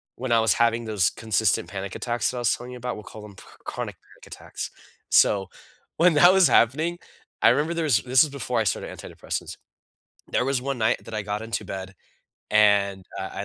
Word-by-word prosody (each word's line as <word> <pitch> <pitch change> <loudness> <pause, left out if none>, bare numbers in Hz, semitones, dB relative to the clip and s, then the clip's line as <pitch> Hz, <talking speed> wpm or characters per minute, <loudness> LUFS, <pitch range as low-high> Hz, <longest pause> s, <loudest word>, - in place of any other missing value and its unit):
when 130 -1 -5
I 115 - +5
was 110 -3 +3
having 115 0 +1
those 105 -6 +1
consistent 110 -2 0
panic 95 -1 -6
attacks 120 -1 -1
that 125 - -7
I - - -2
was 120 - +2
telling 125 +1 -10
you 125 - -8
about, 125 0 -4
we'll 105 - -9
call 110 - -11
them 105 -2 -12
chr - - -16
chronic - - -5
panic - - -19
attacks, - - -8 0.4
so, 95 -2 +4 0.5
when 175 +1 +5
that 175 +5 +7
was 190 -2 +5
happening 155 +9 +2 0.4
I 115 - +7
remember 150 +7 +1
there 165 - -1
was 130 -7 +4
this 130 +4 +4
is 155 - -2
before 140 -7 -2
I - - +2
started - - -2
antidepressants. - - -6 0.7
There - - 0
was 135 -2 0
one 140 -1 -3
night 110 -1 0
that 115 - -9
I 110 - -2
got 105 +1 -4
into 115 +1 -4
bed, 95 0 -7 0.6
and, 100 -2 +3
uh, 95 - -5
I 100 - -5
115 Hz, 215 wpm, -24 LUFS, 105-130 Hz, 0.7 s, that